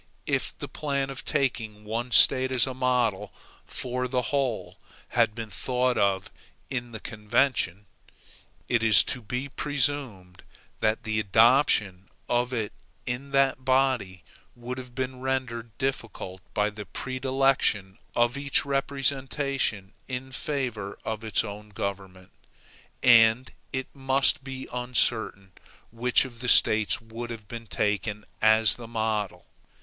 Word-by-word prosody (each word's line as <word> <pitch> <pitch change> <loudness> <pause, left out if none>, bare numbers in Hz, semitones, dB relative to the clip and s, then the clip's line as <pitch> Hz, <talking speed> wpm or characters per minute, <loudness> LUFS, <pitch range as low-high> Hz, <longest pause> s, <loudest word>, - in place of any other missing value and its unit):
If - - -1
the - - -6
plan 140 -2 -2
of 135 - -6
taking 115 -7 -2
one 115 +3 -3
State 130 +2 +5
as 125 -1 +4
a 130 - -4
model 125 -5 0 0.3
for 125 0 -3
the 125 0 0
whole 135 -5 -1 0.3
had 115 -3 +2
been 115 -2 -6
thought 125 +6 0
of 95 -1 +1 0.4
in 120 -2 -3
the 110 - -7
convention, 105 -3 0 0.8
it 120 - +2
is 110 -5 +6
to 125 - -5
be 125 +5 -4
presumed 135 -10 -1 0.4
that 110 +2 0
the 110 -1 -1
adoption 105 -3 +3 0.2
of 120 +1 +1
it 110 -4 -2 0.3
in 125 +3 -4
that 135 -1 +2
body 130 -9 +1 0.3
would 125 +1 -6
have 125 -1 -11
been 130 -1 -3
rendered 125 -3 -2
difficult 115 -8 -4
by 105 0 +1
the 105 -2 -9
predilection 130 -5 0 0.2
of 120 +1 +2
each 140 0 +1
representation 135 -6 -1
in 130 +1 -5
favor 120 -8 -3
of 110 0 -3
its 110 0 +1
own 105 0 -8
government; 95 -3 -6 0.7
and 115 0 +6 0.2
it 130 0 -2
must 135 +2 +2
be 135 -1 -7
uncertain 120 -5 0 0.4
which 120 +3 +3
of 120 -3 -11
the 125 0 -1
States 105 -5 +5
would 115 +1 -8
have 115 -3 -8
been 115 +1 -8
taken 105 +1 -1 0.2
as 110 0 +6
the 120 -2 -9
model. 110 -3 -2
120 Hz, 135 wpm, -27 LUFS, 105-130 Hz, 0.8 s, is